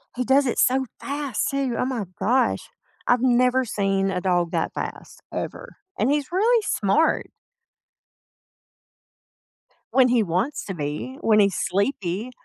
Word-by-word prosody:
He 250 Hz, -, -1 dB
does 270 Hz, +3 st, +3 dB
it 245 Hz, -, -1 dB
so 265 Hz, +1 st, +3 dB
fast 285 Hz, -2 st, -2 dB
too, 275 Hz, -3 st, -1 dB
oh -, -, 0 dB
my 250 Hz, -6 st, -2 dB
gosh. 250 Hz, +5 st, +1 dB, 0.4 s
I've 245 Hz, -1 st, +3 dB
never 250 Hz, +1 st, +3 dB
seen 195 Hz, -3 st, 0 dB
a 180 Hz, -, -2 dB
dog 175 Hz, -2 st, +1 dB
that -, -, -1 dB
fast, -, -, -7 dB
ever, -, -, -6 dB, 0.2 s
and -, -, +2 dB
he's 290 Hz, +1 st, -1 dB
really 450 Hz, +5 st, +3 dB
smart. 290 Hz, -, +1 dB, 2.7 s
When 260 Hz, -1 st, +5 dB
he 240 Hz, -2 st, +3 dB
wants 190 Hz, -, -2 dB
to 195 Hz, -, -4 dB
be, 150 Hz, -, -5 dB
when 215 Hz, -1 st, +4 dB
he's 200 Hz, -3 st, +3 dB
sleepy. 200 Hz, +1 st, -1 dB
245 Hz, 140 wpm, -23 LUFS, 195-265 Hz, 2.7 s, When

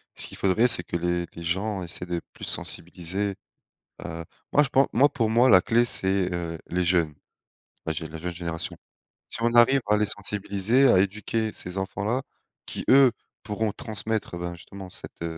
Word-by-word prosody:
ce -, -, -1 dB
qu'il -, -, -9 dB
faudrait, 100 Hz, +5 st, +3 dB
c'est 90 Hz, -, +5 dB
que 85 Hz, -, -3 dB
les 85 Hz, 0 st, -1 dB
les 85 Hz, -, -9 dB
gens 95 Hz, +4 st, -2 dB
essaient 90 Hz, +1 st, -5 dB
de 85 Hz, -1 st, -3 dB
plus -, -, -13 dB
sensibiliser, 95 Hz, +3 st, +2 dB, 0.7 s
heu 80 Hz, +1 st, -6 dB, 0.3 s
moi 145 Hz, -, +5 dB
je -, -, -1 dB
pen 135 Hz, +1 st, +3 dB
moi 135 Hz, +5 st, +5 dB
pour 120 Hz, -7 st, -1 dB
moi 120 Hz, +3 st, +4 dB
la 90 Hz, -, +7 dB
clé, 120 Hz, +3 st, +2 dB
c'est, 95 Hz, -4 st, +2 dB
heu, 85 Hz, -1 st, -4 dB
les 90 Hz, +1 st, -1 dB
jeunes. 85 Hz, -3 st, +1 dB, 0.7 s
La 80 Hz, -, -1 dB
jeune 80 Hz, 0 st, -6 dB
la 80 Hz, -, -8 dB
jeune 90 Hz, +2 st, -5 dB
génération. 85 Hz, -1 st, -5 dB, 0.5 s
Si -, -, -1 dB
on 120 Hz, 0 st, +1 dB
arrive 125 Hz, +3 st, +6 dB
à 105 Hz, -, +4 dB
les 105 Hz, 0 st, +2 dB
sensibiliser, 105 Hz, +5 st, +1 dB
à 95 Hz, -, +5 dB
éduquer 105 Hz, +3 st, -1 dB
ces 90 Hz, +1 st, -7 dB
enfants-là 100 Hz, +6 st, -2 dB, 0.4 s
qui, -, -, -6 dB
eux, 135 Hz, -1 st, +7 dB, 0.3 s
pourront 110 Hz, 0 st, -2 dB
transmettre, 110 Hz, -2 st, -4 dB
bah, 85 Hz, 0 st, -4 dB
justement 95 Hz, +2 st, -11 dB
cette 85 Hz, -, -9 dB
95 Hz, 185 wpm, -25 LUFS, 85-110 Hz, 0.7 s, la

